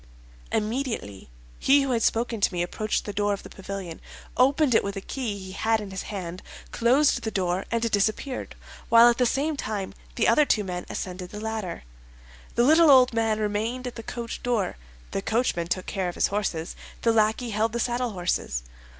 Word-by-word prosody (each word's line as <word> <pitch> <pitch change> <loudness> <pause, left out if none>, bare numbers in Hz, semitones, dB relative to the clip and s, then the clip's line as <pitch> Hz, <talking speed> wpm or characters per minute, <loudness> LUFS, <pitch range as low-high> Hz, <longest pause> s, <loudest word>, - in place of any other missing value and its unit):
Immediately, 220 - -2 0.3
he 280 +1 +5
who 270 - -1
had 235 -2 +1
spoken 230 0 0
to - - +3
me 175 -1 -1
approached 215 +4 -2
the 205 - -4
door 205 0 +1
of 200 - -5
the - - -11
pavilion, 195 -3 -7 0.3
opened 275 +1 +4
it - - +4
with 200 0 -3
a - - -3
key 220 0 -4
he 190 -1 -8
had 220 +3 +1
in 205 -2 -7
his 190 - -4
hand, 185 -3 -5 0.3
closed 260 +5 +3
the 220 - -2
door 185 -2 -1
and 230 0 0
disappeared, 215 +6 -1 0.3
while 230 +1 +8
at 235 - 0
the 250 - +4
same 295 +5 0
time 210 -7 -4 0.2
the - - +2
other 300 - +5
two 215 -7 +2
men 180 -2 -5
ascended 180 -1 -5
the 210 - -7
ladder. 220 - -4 0.7
The 235 - +4
little 315 +4 +6
old 255 -3 +7
man 225 -1 +1
remained 220 +4 -1
at 250 - -4
the 230 - -7
coach 235 +1 -6
door; 235 -5 0 0.4
the 195 - -2
coachman 220 -6 0
took 185 +1 -2
care 190 -3 -2
of 175 - -7
his - - +2
horses, 190 -5 -2 0.3
the 230 - +4
lackey 220 +2 +2
held 215 +2 +1
the 235 - -2
saddlehorses. 210 - -1
220 Hz, 195 wpm, -26 LUFS, 195-240 Hz, 0.7 s, while